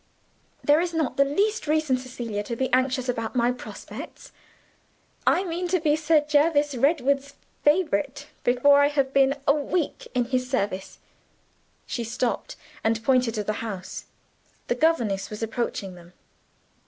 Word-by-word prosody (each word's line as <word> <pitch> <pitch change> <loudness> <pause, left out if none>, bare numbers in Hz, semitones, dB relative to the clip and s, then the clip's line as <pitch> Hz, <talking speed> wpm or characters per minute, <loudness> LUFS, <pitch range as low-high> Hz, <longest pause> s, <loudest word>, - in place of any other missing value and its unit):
"There 295 +1 +5
is 345 -1 -2
not 315 -5 0
the 280 - +6
least 405 +8 0
reason, 310 -3 +2
Cecilia, 245 -4 -4
to 235 - -3
be 260 +2 -2
anxious 255 0 +2
about 230 -1 -2
my 240 0 +3
prospects. 250 - -9 1.0
I 370 - +4
mean 355 0 -3
to 365 +1 +1
be 305 -2 +2
Sir 310 0 +3
Jervis 295 -1 +3
Redwood's 280 +1 +1 0.3
favorite 295 -3 +1 0.2
before 270 +4 +5
I 285 - +5
have 275 -2 0
been 275 0 +4
a 280 - +6
week 300 +2 -2
in 245 -1 +2
his 255 0 -1
service." 200 -7 -2 0.9
She 235 - -3
stopped, 235 +2 -2 0.3
and 225 0 +1
pointed 250 -2 +2
to 210 - -1
the 215 - -1
house. 195 -5 -6 0.6
The - - +3
governess 235 -10 +1
was 210 +1 -6
approaching 225 -4 -3
them. 175 0 -15
265 Hz, 150 wpm, -25 LUFS, 235-300 Hz, 1.0 s, the